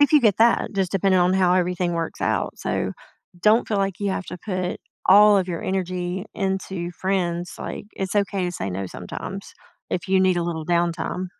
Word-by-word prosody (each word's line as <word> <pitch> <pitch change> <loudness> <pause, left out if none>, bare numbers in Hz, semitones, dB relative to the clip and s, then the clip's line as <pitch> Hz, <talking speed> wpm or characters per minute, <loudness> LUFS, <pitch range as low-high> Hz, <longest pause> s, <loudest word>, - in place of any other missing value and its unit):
If 290 +1 +5
you 300 - +7
get 215 -6 +4
that, 230 +1 +3
just 190 -2 0
depending 195 -1 +3
on 180 +1 +3
how 185 -1 +4
everything 180 -1 0
works 165 -1 -3
out, - - -1
so, - - -2 0.5
don't 215 +5 +4
feel 215 - 0
like 195 -1 -1
you 200 -1 0
have 190 0 -2
to 180 - -7
put 185 -3 -2 0.3
all 205 +1 +7
of 185 - 0
your 170 -2 -3
energy 185 0 -2
into 190 -2 -2
friends, 175 -2 -2
like, - - -6
it's 190 0 -3
okay 200 -2 +1
to 175 - -1
say 100 - -4
no 95 +1 -3
sometimes - - -7 0.4
if 175 - -3
you 190 0 +4
need 185 -1 +3
a 175 - +1
little 165 -2 -3
downtime. 175 +1 0
185 Hz, 200 wpm, -23 LUFS, 175-195 Hz, 0.5 s, you